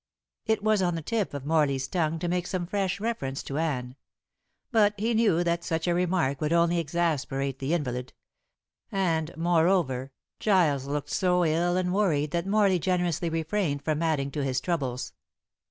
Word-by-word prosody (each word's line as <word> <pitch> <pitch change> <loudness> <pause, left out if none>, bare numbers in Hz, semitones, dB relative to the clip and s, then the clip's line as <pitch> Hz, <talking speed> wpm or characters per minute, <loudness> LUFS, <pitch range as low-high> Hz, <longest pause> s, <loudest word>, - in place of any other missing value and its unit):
It 220 -2 +1
was 215 -2 +3
on 175 -2 +1
the 165 - -4
tip 220 +2 -1
of 140 -1 -6
Morley's 145 -4 +1
tongue 165 0 0
to 175 - -3
make 180 0 -1
some 185 -2 -2
fresh 195 +1 -1
reference 200 -12 -3
to 140 +2 -4
Anne. 130 -6 -2 0.8
But 210 -3 +4
he 225 +3 0
knew 210 -7 +3
that 170 0 0
such 160 -2 -2
a 175 - +3
remark 175 -6 0
would 150 0 0
only 170 0 +3
exasperate 145 -5 -1
the 140 +5 0
invalid; 125 -5 -3 0.8
and, 165 -5 0
moreover, 165 -6 +2 0.3
Giles 160 -10 +2
looked 145 0 -3
so 180 -1 +2
ill 170 +3 +1
and 180 -1 0
worried 155 -8 +1
that 170 +2 -1
Morley 200 -3 +3
generously 175 -2 0
refrained 160 -2 -1
from 155 0 0
adding 150 -4 0
to 145 0 -2
his 130 -1 0
troubles. 135 -6 -3
170 Hz, 170 wpm, -27 LUFS, 145-185 Hz, 0.8 s, But